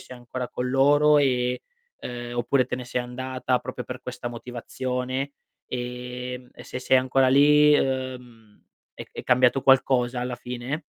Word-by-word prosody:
sei 125 - -11
ancora 125 +1 -5
con 125 0 -3
loro 145 +2 +5
e 125 -2 +1 0.4
uhm, 120 0 -6
oppure 130 +2 +2
te 125 - -3
ne 125 - -6
sei 125 +1 -2
andata 130 0 -2
proprio 130 -1 -6
per 125 +1 -7
questa 125 -1 -5
motivazione, 125 +3 -4 0.3
ehm, 125 0 -6
e - - -12
se - - -6
sei 130 +1 +3
ancora 130 +1 +2
lì, 150 +2 +6
uhm, 125 -5 -4 0.3
è - - -8
è - - -7
cambiato 125 +1 +3
qualcosa 125 -2 +3
alla 125 0 -3
fine? 125 +4 -4
125 Hz, 155 wpm, -25 LUFS, 125-130 Hz, 0.4 s, lì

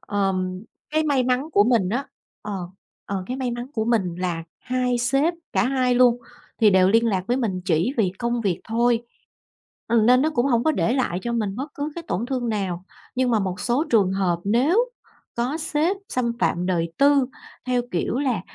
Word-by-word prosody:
Ờm, 190 -1 -2 0.3
cái 315 +1 +1
may 285 -4 +2
mắn 255 +4 0
của 205 - +5
mình 225 -6 +2
á 245 +7 -2 0.4
ờ, 210 - -5 0.5
ờ, 195 -2 -3
cái 255 - -3
may 255 -2 -2
mắn 240 +1 -4
của 220 -5 -1
mình 210 -7 +1
là 175 -3 -2 0.2
hai 250 -1 0
sếp, 275 +8 +2 0.2
cả - - +2
hai 255 -1 +1
luôn 245 -1 +5 0.4
thì 220 -3 +5
đều 185 -1 +5
liên 230 +3 +4
lạc 190 -4 0
với 245 +3 +1
mình 205 -8 -1
chỉ 175 +6 +1
vì 190 -5 +2
công 235 0 -1
việc 195 -6 -1
thôi, 235 +1 +1 0.9
ừm, 230 -2 +3
nên 255 +1 +6
nó 315 - +2
cũng 250 -2 +1
hông 235 -3 +2
có 315 - +3
để 235 - +1
lại 245 -9 0
cho 235 - -2
mình 210 -3 -1
bất 275 +3 -6
cứ 290 +2 -3
cái 340 - -6
tổn 225 +6 -1
thương 250 -2 -2
nào. 190 -5 -2 0.3
Nhưng 255 -1 +1
mà 225 - +3
một 190 -1 -3
số 250 +6 +1
trường 200 -5 +3
hợp 185 -3 0
nếu 305 - +2 0.5
có 255 +7 -1
sếp 320 +4 0
xâm 240 -2 0
phạm 180 -6 0
đời 170 -3 0
tư 280 -1 +5 0.4
theo 250 -1 +1
kiểu 180 +8 -1
là 260 -8 0
235 Hz, 205 wpm, -23 LUFS, 195-255 Hz, 0.9 s, nên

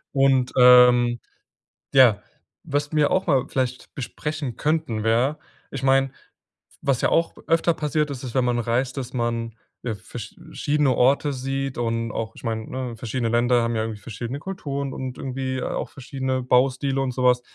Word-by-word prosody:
Und, 135 -2 +3
ähm, 125 -1 +7 0.7
ja, 120 -6 +6 0.4
was 145 +1 -2
wir 150 -1 +3
auch 185 - +1
mal 135 -5 +3
vielleicht 130 -1 -3
besprechen 145 0 -4
könnten, 150 -8 -1
wäre 120 +7 +2 0.3
ich 135 -1 -5
meine, 135 0 +3 0.7
was 135 -4 +1
ja - - +3
auch 165 - +1
öfter 165 +1 +3
passiert 150 -1 -1
ist, 135 -2 -6
ist, 125 -3 -6
wenn 130 -1 +3
man 120 -1 +1
reist, 120 +3 -1
dass 130 -2 -4
man 115 -2 -2 0.3
ja 115 -3 -2
versch 95 - -9 0.2
schiedene 145 -3 +1
Orte 140 +3 +3
sieht 135 +1 -3
und 115 -1 -1
auch 110 0 -3
ich - - -14
meine, 110 -2 -2
ne, 125 -2 -4
verschiedene 115 +1 -3
Länder 120 +1 +3
haben 115 0 -1
ja 110 - 0
irgendwie 110 -2 -5
verschiedene 120 +5 -6
Kulturen 140 -6 -4
und 130 -1 -5
irgendwie 130 0 -3
auch - - -3
verschiedene 130 -1 -3
Baustile 135 +2 +2
und 135 -1 -1
so 125 - -2
was. 125 -1 +4
130 Hz, 170 wpm, -23 LUFS, 120-135 Hz, 0.7 s, ähm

